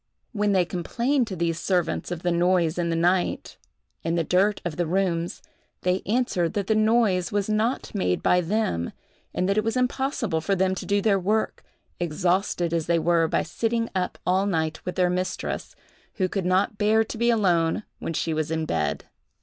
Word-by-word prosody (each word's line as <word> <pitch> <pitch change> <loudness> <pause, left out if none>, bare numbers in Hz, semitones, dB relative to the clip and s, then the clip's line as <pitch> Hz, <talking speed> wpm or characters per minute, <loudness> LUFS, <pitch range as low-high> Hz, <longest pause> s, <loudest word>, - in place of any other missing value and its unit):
When 210 -3 +1
they 185 -2 +3
complained 235 - 0
to 195 - -5
these 165 -1 -1
servants 175 -3 0
of 175 -1 -5
the 175 - +1
noise 175 -1 +2
in 170 -1 0
the 165 - 0
night, 175 +2 0 0.5
and 165 +1 0
the 165 - +2
dirt 190 +5 +2
of 170 -3 -3
the 175 0 -1
rooms, 175 -1 -1 0.4
they 180 +1 +1
answered 205 -7 +1
that 200 -2 -1
the 220 - +2
noise 215 -4 +2
was 205 -1 0
not 220 +4 -1
made 90 - 0
by 180 - +4
them, 170 - -1 0.4
and 180 - -1
that 200 +2 +2
it - - 0
was 225 +3 -1
impossible 250 - 0
for 195 +4 0
them 190 0 +2
to 190 - -6
do 200 0 +1
their 200 -3 +3
work, 215 +4 -1 0.4
exhausted 175 +1 0
as 165 -2 -1
they 170 0 +3
were 165 0 +2
by - - +1
sitting 230 +8 -1
up 185 -1 -2
all 190 +2 +2
night 160 -4 -1
with 180 - -3
their 180 -1 +2
mistress, 185 +1 -3 0.4
who 185 - +1
could 185 -1 -2
not 190 +3 +1
bear 220 +1 +4
to 225 - -7
be 235 0 +3
alone 180 -5 +2 0.2
when 165 - -4
she 165 +1 -1
was 155 -1 -1
in 160 0 -1
bed. - - -1
185 Hz, 195 wpm, -25 LUFS, 170-210 Hz, 0.5 s, by